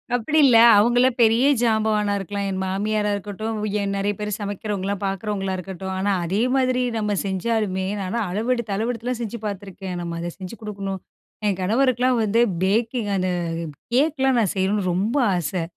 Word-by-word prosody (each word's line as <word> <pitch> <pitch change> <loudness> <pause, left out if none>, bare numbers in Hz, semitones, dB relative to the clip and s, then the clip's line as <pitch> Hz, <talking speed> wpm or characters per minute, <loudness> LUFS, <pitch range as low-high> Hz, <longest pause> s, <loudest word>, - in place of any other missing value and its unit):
அப்படி 245 +7 0
இல்ல. 240 -4 +6 0.2
அவங்களலாம் 245 +4 +3
பெரிய 230 +4 +5
ஜாம்பவானா 215 -2 +2
இருக்கலாம். 200 +1 -4
என் 190 0 -2
மாமியாரா 210 +2 0
இருக்கட்டும், 210 +2 -4
வ் - - 0
ஏன் 200 0 -1
நெறைய 200 +1 0
பேரு 210 0 -3
சமைக்கிறவங்கல்லாம் 200 -1 -3
பாக்குறவங்களா 195 -1 -2
இருக்கட்டும், 190 +1 -6
ஆனா, 200 +2 0
அதே 190 +5 -1 0.2
மாதிரி 255 -1 +2 0.2
நம்ம 210 -1 0
செஞ்சாலுமே 190 -1 -1
நான்லாம் 205 +3 -2
அளவெடுத்து 225 +2 -1
அளவெடுத்தலாம் 235 +3 -2
செஞ்சு 235 +1 -4
பாத்துருக்கேன். 195 -2 -5
நம்ம 170 -1 -4
அதை 170 +1 -3
செஞ்சு 185 +3 -7
கு - - -9
டுக்கணும் 195 -2 -4 0.5
என் 195 -2 0
கணவருக்கெலாம் 250 +4 +2
வந்து 215 +2 +1 0.2
பேக்கிங் 220 +2 0
அந்த 185 0 0 0.7
கேக்கலாம் 270 -2 +2
நான் 205 -5 +1
செய்யணும்னு 190 0 0
ரொம்ப 200 +9 0 0.2
ஆசை. 175 +1 -2
205 Hz, 155 wpm, -23 LUFS, 195-230 Hz, 0.7 s, இல்ல